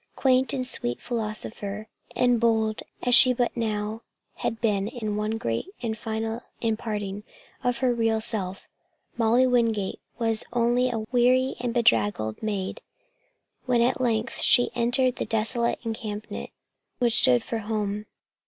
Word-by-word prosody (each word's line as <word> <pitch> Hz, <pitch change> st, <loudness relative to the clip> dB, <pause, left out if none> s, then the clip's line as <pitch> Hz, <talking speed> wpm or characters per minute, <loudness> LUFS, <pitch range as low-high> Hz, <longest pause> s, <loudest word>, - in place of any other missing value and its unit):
Quaint 260 Hz, -1 st, +3 dB
and 255 Hz, -2 st, -1 dB
sweet 120 Hz, -, -2 dB
philosopher, 215 Hz, -2 st, -4 dB, 0.3 s
and 245 Hz, -1 st, +3 dB
bold 220 Hz, -2 st, +1 dB, 0.2 s
as 245 Hz, -, +3 dB
she 255 Hz, 0 st, +9 dB
but 245 Hz, 0 st, -1 dB
now 215 Hz, -1 st, -2 dB, 0.4 s
had 225 Hz, -, -2 dB
been 205 Hz, -3 st, +1 dB
in 220 Hz, -3 st, -4 dB
one 215 Hz, +1 st, -1 dB
great 115 Hz, -, -2 dB, 0.2 s
and 225 Hz, -2 st, -1 dB
final 225 Hz, +1 st, -3 dB, 0.2 s
imparting 210 Hz, -3 st, -3 dB, 0.4 s
of 245 Hz, -1 st, +1 dB
her 245 Hz, -, +3 dB
real 225 Hz, -1 st, +1 dB
self, 195 Hz, -4 st, -3 dB, 0.5 s
Molly 235 Hz, +2 st, +3 dB
Wingate 230 Hz, -6 st, +1 dB, 0.2 s
was 225 Hz, -2 st, 0 dB
only 245 Hz, +1 st, +2 dB
a 240 Hz, -, -2 dB
wet, 220 Hz, +3 st, -7 dB
weary 255 Hz, +2 st, +3 dB
and 245 Hz, -1 st, -2 dB
bedraggled 110 Hz, -, +2 dB
maid 210 Hz, -, -3 dB, 0.9 s
when 245 Hz, -2 st, +3 dB
at 250 Hz, +2 st, +1 dB
length 230 Hz, -3 st, -1 dB
she 245 Hz, -, +5 dB
entered 245 Hz, +2 st, +2 dB
the -, -, -2 dB
desolate 230 Hz, +2 st, 0 dB
encampment 220 Hz, -2 st, -5 dB, 0.5 s
which 240 Hz, -1 st, +2 dB
stood 125 Hz, -1 st, +4 dB
for 230 Hz, -, -3 dB
home. 210 Hz, -1 st, -3 dB
225 Hz, 145 wpm, -26 LUFS, 215-245 Hz, 0.9 s, she